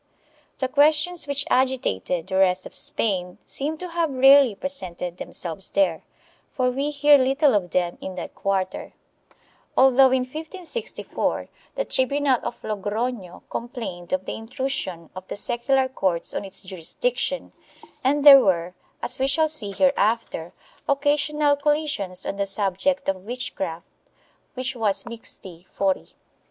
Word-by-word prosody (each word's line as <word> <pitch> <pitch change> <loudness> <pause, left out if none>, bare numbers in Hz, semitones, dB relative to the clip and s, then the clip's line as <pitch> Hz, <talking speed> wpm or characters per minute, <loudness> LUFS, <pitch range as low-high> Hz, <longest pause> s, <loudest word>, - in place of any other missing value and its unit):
The 260 - -1
questions 305 +5 +3
which 285 0 0
agitated 245 - +1
the 190 0 -2
rest 185 -1 +3
of - - -10
Spain 180 -5 -1
seem 300 +3 -3
to 360 +2 -6
have 335 -1 0
rarely 270 -3 +6
presented 180 -8 -5
themselves 175 +1 -5
there, 190 -5 +1 0.5
for 255 -2 +2
we 275 +3 -1
hear 290 0 +5
little 270 +2 +3
of 190 -4 +1
them 175 0 -1
in 190 - -6
that 180 - -6
quarter, 190 -1 -2 0.8
although, 265 0 +6
in 260 0 +2
1564, 325 - -4 0.3
the - - -1
tribunal 270 -1 +1
of - - -5
Logrono 210 -1 -3
complained 220 -8 -6
of 185 0 -1
the - - -4
intrusion 225 - -4
of 185 0 -9
the - - -5
secular 260 +5 +1
courts 190 -9 -1
on - - -3
its 195 +1 -6
jurisdic 190 - -3
tion - - -2 0.5
and 285 +2 +1
there 275 -2 +12
were, 180 -5 +1 0.3
as 245 +2 -1
we 265 - +2
shall 315 +3 +3
see 270 -10 -3
hereafter, 225 - +1 0.4
occasional 290 +1 +2
collisions 285 -11 -1
on 200 - -3
the 200 0 -1
subject 195 +7 0
of 195 -1 +1
witchcraft, 195 -7 -4 0.7
which 255 0 -3
was 215 -4 0
mixti 190 -7 -9
fori. 195 -1 -1
245 Hz, 140 wpm, -24 LUFS, 190-280 Hz, 0.8 s, there